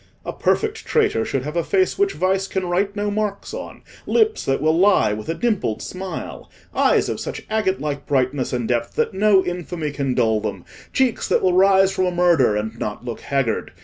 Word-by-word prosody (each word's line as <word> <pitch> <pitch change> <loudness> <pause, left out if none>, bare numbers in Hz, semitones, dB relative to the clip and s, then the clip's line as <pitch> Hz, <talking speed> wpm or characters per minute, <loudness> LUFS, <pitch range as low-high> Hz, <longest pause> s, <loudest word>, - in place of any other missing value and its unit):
A - - -4
perfect - - 0
traitor 110 - +2
should 130 +3 -2
have 150 +3 -5
a 170 - +1
face 185 +1 +1
which 400 0 +1
vice 190 +1 0
can 190 -1 -2
write 195 +3 0
no 205 0 -1
marks 210 -1 -3
on—lips 440 -1 -2
that 135 0 +1
will 155 +3 +2
lie 180 - +4
with 110 +7 -6
a 165 - -1
dimpled 210 - -1
smile—eyes 185 0 -2
of - - -3
such - - -5
agate 210 -3 +1
like 145 -2 -4
brightness 130 -1 0
and 120 -2 -2
depth 120 -1 -1
that - - 0
no 195 -1 +4
infamy 175 -3 -4
can 140 -3 -2
dull 110 -3 +2
them—cheeks 240 - -2
that - - +1
will 185 -1 +3
rise 190 +1 +5
from 185 -1 0
a - - 0
murder 170 -10 +3
and 110 +2 -4
not 105 +3 -5
look 120 -2 -5
haggard. 135 -9 -1
175 Hz, 190 wpm, -21 LUFS, 130-195 Hz, -, rise